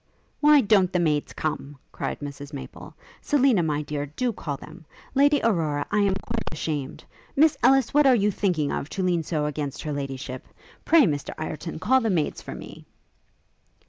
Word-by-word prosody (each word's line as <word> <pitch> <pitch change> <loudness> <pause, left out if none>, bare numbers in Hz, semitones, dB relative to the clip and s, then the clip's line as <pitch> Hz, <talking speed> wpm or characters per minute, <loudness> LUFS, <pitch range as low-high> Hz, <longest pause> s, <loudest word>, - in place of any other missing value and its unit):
'Why 300 -1 +6
don't 200 -5 +3
the 180 - +1
maids 150 -4 0
come?' 145 -2 -4
cried - - -4
Mrs 145 0 -8
Maple. 140 - -9 0.3
'Selina, 265 -8 +3
my 150 -2 -1
dear, 145 0 -4
do 235 - -2
call 145 -7 -5
them. 160 +5 -13 0.3
Lady 285 +1 +4
Aurora, 155 -9 +1
I 210 - +2
am 200 -2 +2
quite 225 +4 -4
ashamed. 150 -3 -4 0.3
Miss 305 +1 +5
Ellis, 270 -3 +4
what 295 -1 +5
are 260 - +6
you 210 -2 +2
thinking 175 -8 0
of, 145 - -3
to 190 - -3
lean 175 -2 +1
so 155 -1 -2
against 150 -1 -4
Her 150 -2 -3
Ladyship? 135 -2 -5 0.4
Pray, 330 -2 +6
Mr 145 - -1
Ireton, 155 +1 -5
call 260 +11 +3
the 225 - 0
maids 165 -6 -1
for - - -8
me.' - - -11
165 Hz, 175 wpm, -25 LUFS, 145-230 Hz, 0.4 s, Why